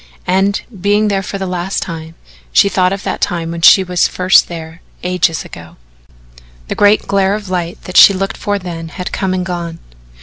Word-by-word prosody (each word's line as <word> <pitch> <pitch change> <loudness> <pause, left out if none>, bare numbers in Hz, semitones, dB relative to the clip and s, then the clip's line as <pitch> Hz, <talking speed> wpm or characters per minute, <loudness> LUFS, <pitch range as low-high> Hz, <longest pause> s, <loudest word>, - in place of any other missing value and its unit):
And 195 +2 +1 0.2
being 205 +2 +2
there 195 -1 0
for 195 +1 -5
the 195 - -4
last 180 +1 -3
time 165 -1 -8 0.4
she 200 - +4
thought 185 -2 +1
of 195 0 -4
that - - -4
time 165 -1 -2
when 170 0 -6
she 190 +3 +7
was 180 -1 +1
first 185 +1 +3
there 165 -1 -9 0.2
ages 180 -3 0
ago. 80 -1 -12 0.9
The - - -1
great 205 +1 +3
glare 195 0 +1
of 205 -3 -7
light 175 -1 -3
that 180 - -3
she - - +9
looked 195 0 -3
for 205 0 -2
then 170 -3 -7
had 180 +2 -6
come 190 -2 -2
and 180 0 -2
gone. 170 -2 -5
180 Hz, 195 wpm, -15 LUFS, 170-195 Hz, 0.9 s, she